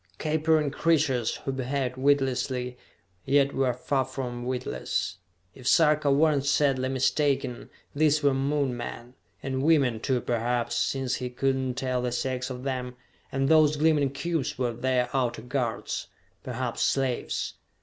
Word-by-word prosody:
Capering 155 -1 +1
creatures, 145 -7 +1
who 135 - 0
behaved 130 0 -2
witlessly, 130 -2 +1 0.5
yet 140 0 +3
were 135 -1 +2
far 130 +2 0
from 125 -2 -5
witless. 65 - -2 0.4
If 125 - -8
Sarka 150 -2 +4
were 155 +3 +4
not 140 -1 -1
sadly 135 -3 +2
mistaken, 135 -1 0 0.2
these 150 0 +2
were 140 -1 +4
Moon 135 -1 0
men 120 0 -7 0.3
and 130 -1 -2
women, 140 -7 +3
too, 125 +2 0
perhaps, 120 0 -1
since 130 +1 0
he 125 -1 -4
could 135 +2 0
not 130 -1 -2
tell 130 -1 -1
the 125 0 -1
sex 125 +1 -2
of 125 -1 -6
them 125 -2 -3 0.4
and 135 0 0
those 155 -1 +5
gleaming 150 -2 +3
cubes 155 +1 -2
were 125 -2 -1
their 125 +1 0
outer 120 -4 0
guards, 125 -2 -2 0.4
perhaps - - -3
slaves. 135 -3 0
130 Hz, 145 wpm, -27 LUFS, 125-140 Hz, 0.5 s, those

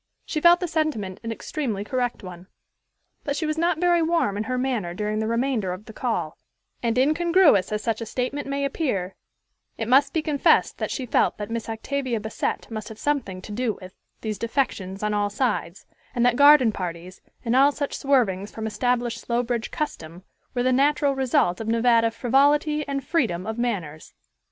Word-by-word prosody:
She 305 - -3
felt 345 +1 +7
the 360 - -2
sentiment 300 - -2
an 230 - -4
extremely 225 -3 -3
correct 245 0 -2
one. 180 0 -10 0.8
But 285 - -2
she 320 - -2
was 310 0 -1
not 335 +1 +1
very 350 -1 +3
warm 325 -11 +1
in 210 +1 -2
her 255 +2 -2
manner 240 -9 -2
during 210 +2 -2
the 220 - -1
remainder 230 -4 0
of 190 +4 -9
the 220 - -11
call; 180 -11 -3 0.4
and, 235 0 0
incongruous 310 - +4
as 210 0 -2
such 225 -1 -1
a 230 - -5
statement 255 +5 -3
may 280 0 -1
appear, 230 - -2 0.6
it 225 - -3
must 275 +3 +4
be 320 - -1
confessed 295 -3 +2
that - - -2
she 260 - -3
felt 240 - +1
that 210 +1 -6
Miss 230 -1 -4
Octavia 250 +1 -2
Bassett 220 +2 -3
must 215 0 -5
have 220 - -10
something 230 -10 -2
to - - -9
do 230 +1 -1
with 185 -1 -11 0.3
these 215 -3 -4
defections 215 -6 -2
on 210 0 0
all 205 0 +1
sides, 205 -5 -2 0.3
and 240 0 +2
that 245 -1 +4
garden 285 -4 +7
parties, 180 -1 -6 0.2
and 235 +1 +1
all 275 +2 +6
such 285 0 -4
swervings 215 -8 +1
from 220 - -6
established 240 +2 -1
Slowbridge 235 -1 -1
custom, 175 - -5 0.3
were 245 - +1
the 255 0 +2
natural 285 +1 +3
result 250 -8 +1
of 220 - -5
Nevada 230 0 +3
frivolity 285 +6 +2
and 275 -1 -3
freedom 220 - 0
of 220 +2 -4
manners. 180 -11 -3
240 Hz, 185 wpm, -24 LUFS, 210-280 Hz, 0.8 s, felt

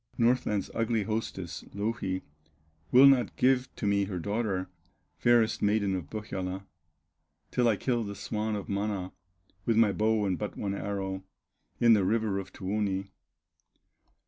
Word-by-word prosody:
Northland's 115 -4 +1
ugly 115 -1 0
hostess, 110 -5 -4
Louhi, 100 -3 -2 0.7
Will 130 +2 +8
not 135 -3 +5
give 130 0 +3
to - - -4
me 100 -1 +2
her 95 -2 -4
daughter, 100 0 -1 0.5
Fairest 120 -2 +3
maiden 105 -1 +2
of 85 -6 -5
Pohyola, 95 -3 -4 0.9
Till 125 -1 +2
I 110 - +4
kill 120 +2 0
the 100 -1 -5
swan 110 +1 -2
of 100 - -5
Mana, 100 -2 -2 0.6
With 115 -2 +3
my 115 -3 +5
bow 110 +1 +1
and 95 -2 -1
but 105 - -4
one 100 -1 -2
arrow, 95 -1 -3 0.6
In 115 -1 +6
the 105 -3 +4
river 105 0 +1
of 95 - -8
Tuoni." 100 0 -2
105 Hz, 145 wpm, -29 LUFS, 95-115 Hz, 0.9 s, Will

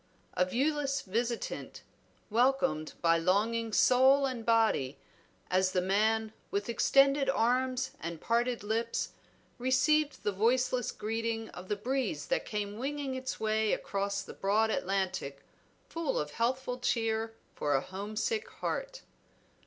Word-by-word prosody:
A 180 - +2
viewless 275 +6 0
visitant, 230 +4 -3 0.5
welcomed 245 -9 +2
by 165 0 +4
longing 220 +6 +1
soul 265 +5 +5
and 255 -4 -3
body 220 - +2 0.5
as 185 0 +2
the 185 - +3
man, 215 +4 +1 0.2
with 200 0 -2
extended 275 +3 +4
arms 255 +1 +1
and 170 -1 -5
parted 235 +3 0
lips 225 +2 -1 0.5
received 285 +4 +2
the 205 - +1
voiceless 245 +4 +1
greeting 225 +1 -3
of 180 +1 -10
the 210 - 0
breeze 260 +6 -2
that - - 0
came 210 -1 -3
winging 280 +1 -3
its 260 0 -4
way 220 0 +1
across 200 0 -2
the - - -10
broad 215 +3 +1
Atlantic, 190 -9 -2 0.4
full 330 -3 -2
of 150 0 -2
healthful 250 - -1
cheer 225 -2 0 0.2
for 145 -1 0
a 135 - +2
home 195 +5 -7
sick 445 - -1
heart. - - -4
225 Hz, 130 wpm, -31 LUFS, 200-260 Hz, 0.5 s, soul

